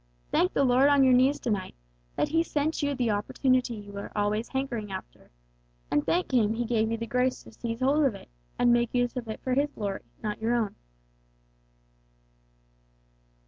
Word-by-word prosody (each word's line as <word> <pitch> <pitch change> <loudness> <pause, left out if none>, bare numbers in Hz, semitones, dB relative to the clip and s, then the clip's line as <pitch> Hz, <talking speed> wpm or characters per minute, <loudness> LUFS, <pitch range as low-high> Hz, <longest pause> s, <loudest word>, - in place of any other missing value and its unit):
Thank 180 - +2
the 275 - +2
Lord 260 +2 +5
on 285 -1 +5
your 260 -1 +5
knees 260 +3 +4
to 240 - -1
night, 190 -3 -3 0.4
that - - 0
He 325 +1 +3
sent 310 -1 -1
you 285 -1 0
the 245 -4 0
opportunity 250 +4 +1
you 205 -1 -10
were 200 0 -7
always 210 +2 0
hankering 245 -6 -3
after; 190 0 -9 0.6
and 145 - +2
thank 355 -2 0
Him 220 -3 +3
He 240 +1 -1
gave 220 -1 +1
you 230 - -1
the 230 - -4
grace 250 +2 0
to - - -14
seize 230 0 -5
hold 285 +3 +3
of 250 -7 +1
it, - - -13 0.3
and 240 -1 +4
make 240 0 +1
use 245 0 +1
of 245 -2 -4
it 220 - -5
for 255 - 0
His 285 +3 +2
Glory, 200 -5 -4 0.2
not 210 0 -3
your 230 +2 +1
own!" 220 -4 -1
240 Hz, 190 wpm, -28 LUFS, 215-265 Hz, 0.6 s, Lord